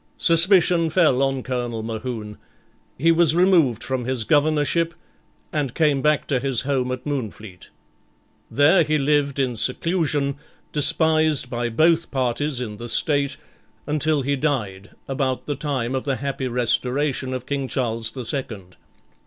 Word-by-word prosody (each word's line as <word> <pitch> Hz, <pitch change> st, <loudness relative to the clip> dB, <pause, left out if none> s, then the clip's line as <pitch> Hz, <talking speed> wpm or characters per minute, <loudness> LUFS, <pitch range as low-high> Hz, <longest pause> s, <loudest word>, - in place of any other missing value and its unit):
Suspicion 170 Hz, -1 st, +4 dB
fell 155 Hz, -6 st, +2 dB
on 135 Hz, -1 st, -1 dB
Colonel 120 Hz, -3 st, -4 dB
Mohune; 110 Hz, -1 st, -6 dB, 0.6 s
he 165 Hz, +5 st, +3 dB
was 165 Hz, -2 st, +4 dB
removed 170 Hz, -, +3 dB
from 130 Hz, -2 st, -3 dB
his 130 Hz, -2 st, -1 dB
Governorship, 155 Hz, +5 st, +1 dB, 0.6 s
and 145 Hz, -6 st, -2 dB
came 150 Hz, -4 st, +2 dB
back 150 Hz, 0 st, +1 dB
to 135 Hz, -3 st, +1 dB
his 135 Hz, -3 st, 0 dB
home 130 Hz, -2 st, -1 dB
at 130 Hz, 0 st, -6 dB
Moonfleet. 110 Hz, -9 st, -6 dB, 0.8 s
There 160 Hz, +6 st, +4 dB
he 155 Hz, 0 st, 0 dB
lived 145 Hz, -1 st, 0 dB
in 130 Hz, -3 st, -1 dB
seclusion, 145 Hz, +3 st, 0 dB, 0.3 s
despised 155 Hz, -2 st, +3 dB
by 120 Hz, -1 st, -2 dB
both 165 Hz, +7 st, +2 dB
parties 130 Hz, +1 st, -2 dB
in 110 Hz, -4 st, -6 dB
the 120 Hz, +2 st, -7 dB
State, 140 Hz, +2 st, +1 dB, 0.5 s
until 150 Hz, -1 st, 0 dB
he 140 Hz, +2 st, 0 dB
died, 110 Hz, -10 st, -3 dB, 0.2 s
about 135 Hz, -1 st, -2 dB
the 145 Hz, -, -3 dB
time 135 Hz, -3 st, -3 dB
of 130 Hz, -, -2 dB
the 135 Hz, -2 st, -1 dB
happy 135 Hz, -1 st, -4 dB
Restoration 125 Hz, +3 st, 0 dB
of 130 Hz, -1 st, -5 dB
King 140 Hz, -1 st, -3 dB
Charles 115 Hz, -4 st, -1 dB
the 130 Hz, -3 st, -7 dB
Second. 105 Hz, -9 st, -5 dB
135 Hz, 145 wpm, -22 LUFS, 125-150 Hz, 0.8 s, Suspicion